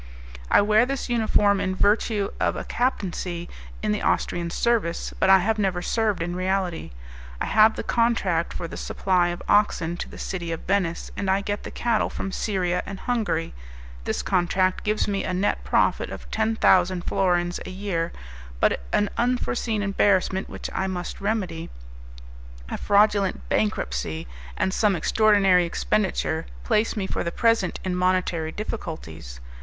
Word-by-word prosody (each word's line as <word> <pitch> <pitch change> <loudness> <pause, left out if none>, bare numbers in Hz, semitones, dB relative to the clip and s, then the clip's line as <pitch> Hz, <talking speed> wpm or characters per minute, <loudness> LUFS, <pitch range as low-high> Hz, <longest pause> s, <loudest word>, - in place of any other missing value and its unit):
"I - - +6
wear 215 +2 +4
this 275 -1 -3
uniform 210 -4 +3
in 185 -1 -1
virtue 205 0 +2
of - - +1
a - - -4
captaincy 180 -8 -2 0.4
in 215 - +1
the 210 - -1
Austrian 170 -1 0
service, 210 -3 0
but 190 - +3
I 190 - +9
have 215 +4 0
never 185 -3 0
served 215 -5 0
in 175 +1 -3
reality. 185 - -1 0.5
I - - -1
have 220 +1 +5
the - - -4
contract 205 -8 +1
for 170 - -5
the - - -8
supply 180 -2 +1
of 175 0 -4
oxen 175 -5 +2
to - - -5
the - - -11
City 175 -3 -4
of 165 - -4
Venice, 185 -4 -1
and 195 - -2
I 190 +1 +2
get 205 +1 -3
the - - -7
cattle 235 -2 0
from 195 - -5
Styria 185 -4 -1
and 195 -1 -7
Hungary. 220 -9 -1 0.5
This - - -2
contract 185 0 +1
gives 215 0 0
me 200 -1 -1
a 180 - -2
net 195 +3 0
profit - - +1
of - - -9
ten 220 +1 0
thousand 185 -3 +3
florins 175 -2 +1
a - - -8
year; 185 -3 -2 0.5
but - - +2
an 205 - +2
unforeseen 240 -3 0
embarrassment, 195 -1 +1
which - - -6
I 190 - -1
must 180 -1 -5
remedy; 190 -6 -2 1.0
a - - -3
fraudulent 205 -1 +2
bankruptcy, 80 - -1 0.3
and 190 - 0
some 205 -2 +2
extraordinary 195 0 +4
expenditure, 60 - -1 0.2
place 215 - +1
me 200 - -1
for - - -2
the 170 - -2
present 230 -3 +1
in 185 -1 -1
monetary 180 -3 0
difficulties. 80 - -6
190 Hz, 160 wpm, -24 LUFS, 175-210 Hz, 1.0 s, I